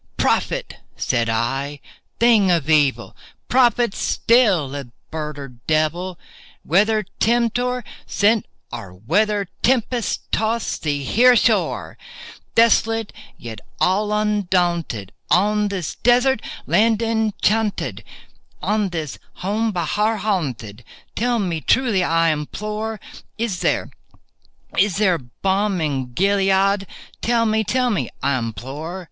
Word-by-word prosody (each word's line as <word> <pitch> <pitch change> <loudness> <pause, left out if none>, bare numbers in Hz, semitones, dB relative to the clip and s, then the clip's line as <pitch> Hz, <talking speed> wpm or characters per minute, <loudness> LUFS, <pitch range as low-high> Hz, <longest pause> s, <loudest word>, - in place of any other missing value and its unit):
"Prophet!" - - 0 0.2
said 115 -2 0
I, 135 +6 -1 0.4
"thing 225 -5 +5
of 165 -5 +1
evil!—prophet 195 - +1
still, 205 - +2
if 140 -3 -5 0.2
bird 150 -2 -4
or 140 -1 -7 0.2
devil!— 165 +4 0 0.5
Whether 210 +5 +2
Tempter 240 +2 +1 0.2
sent, 215 +1 +2 0.2
or 95 -2 -7
whether 200 - 0
tempest 245 -1 +1
tossed 220 0 -1
thee 145 -2 -1
here 245 - +5
ashore, 240 - +1 0.6
Desolate 225 -1 +3 0.2
yet 110 -2 -8 0.2
all 205 +3 +2
undaunted, 175 - 0 0.2
on 210 +5 +3
this 190 -6 -3
desert 245 +1 +3 0.2
land 215 +7 +3
enchanted— 220 -1 0 0.6
On 210 -2 0
this 160 -5 -5 0.3
home 220 +3 0
by 175 -4 -2
Horror 215 +6 +1
haunted—tell 160 - -3
me 175 -7 -2
truly, 230 -6 +2
I 165 -1 +2
implore— 210 +8 -4 0.4
Is 220 -5 -2
there—is 195 -2 -3
there 190 -5 +2
balm 190 - -1
in 135 -5 -2
Gilead?—tell 195 - +1
me—tell 225 +3 +1
me, 200 - -1
I 140 -2 +1
implore!" 135 - -6
195 Hz, 105 wpm, -21 LUFS, 155-220 Hz, 0.6 s, thing